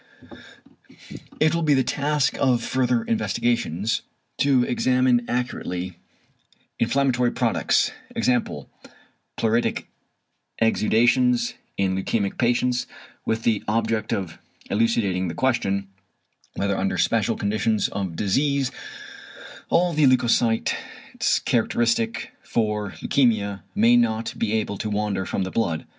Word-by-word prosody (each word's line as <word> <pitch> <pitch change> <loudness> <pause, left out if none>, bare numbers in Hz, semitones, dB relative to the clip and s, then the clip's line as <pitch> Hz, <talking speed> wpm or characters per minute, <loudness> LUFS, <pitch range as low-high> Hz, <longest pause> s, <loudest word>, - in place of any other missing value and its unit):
It 155 +1 +3
will 170 - 0
be 150 -3 +3
the 130 - +3
task 145 +2 0
of 125 -4 +2
further 125 -2 +1
investigations 115 -2 0 0.4
to 135 -3 +4
examine 125 0 +2
accurately 90 -7 -3 0.8
inflammatory 125 0 +2
products, - - +1 0.3
e.g. - - +2 1.1
pleuritic 115 +1 0 0.7
exudations, 235 - +2 0.2
in 95 -1 +1
leukæmic 100 +1 -2
patients, 125 +1 +1 0.4
with 110 0 -1
the 110 -3 +1
object 110 0 0
of 95 -5 -3 0.3
elucidating 100 -4 +1
the 85 - -5
question, 100 -7 0 0.7
whether 100 0 0
under 95 0 -1
special 115 0 +1
conditions 110 +1 0
of 95 -4 -4
disease 135 - +1 1.0
all 175 0 +2
the 150 -2 +4
leucocytes 120 -3 +2 0.7
characteristic 115 -1 0
for 105 -2 -1
leukæmia 110 -7 +1
may 115 +3 +5
not 115 -1 +1
be 110 -1 -1
able 105 -2 -1
to 110 - -3
wander 105 -2 -1
from 95 - -1
the 95 - -4
blood. 85 -9 -1
115 Hz, 110 wpm, -23 LUFS, 105-125 Hz, 1.1 s, may